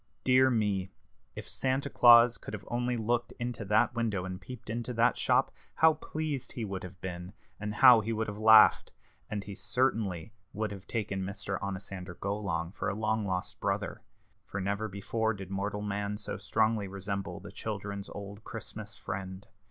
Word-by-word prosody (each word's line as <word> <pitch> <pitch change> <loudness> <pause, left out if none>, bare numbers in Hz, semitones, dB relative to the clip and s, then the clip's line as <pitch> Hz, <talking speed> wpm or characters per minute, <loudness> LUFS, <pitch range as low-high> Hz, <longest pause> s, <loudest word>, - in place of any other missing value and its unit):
Dear 130 0 +5
me! 105 -6 0 0.5
if - - -7
Santa 135 +1 0
Claus 120 -2 +7
could - - -6
have 105 - -10
only 120 0 0
looked 120 +2 0
into 120 -2 -3
that 105 +3 +3
window 110 -6 -1
and 95 -1 -6
peeped 125 -2 -10
into 120 +2 -3
that 115 +2 +4
shop, 130 +1 +2 0.2
how 160 0 +6
pleased 155 -3 -4
he 115 - -3
would 95 -2 -4
have 90 0 -9
been, 90 0 -6 0.3
and 105 0 -4
how 125 -1 +8
he 110 +2 -3
would 110 0 -1
have 105 0 -6
laughed! 110 0 +7 0.4
And 105 -1 -3
he 100 - -7
certainly 110 -6 -1 0.2
would 110 0 -2
have 100 -2 -9
taken 105 -4 -2
Mr. 95 0 -3
Onosander 95 -2 -5
Golong 95 -4 -2
for 95 - -2
a 95 - -2
long 110 0 0
lost 90 -1 -3
brother, 100 +2 -2 0.4
for 100 - -5
never 100 +3 -1
before 110 +2 -1
did 95 -1 -8
mortal 100 +1 -2
man 105 0 -2
so 105 - -4
strongly 110 0 +1
resemble 100 +1 -4
the 100 +1 -10
children's 100 -1 -5
old 100 +1 -8
Christmas 110 -1 -8
friend. 95 -1 -6
105 Hz, 175 wpm, -30 LUFS, 100-115 Hz, 0.5 s, how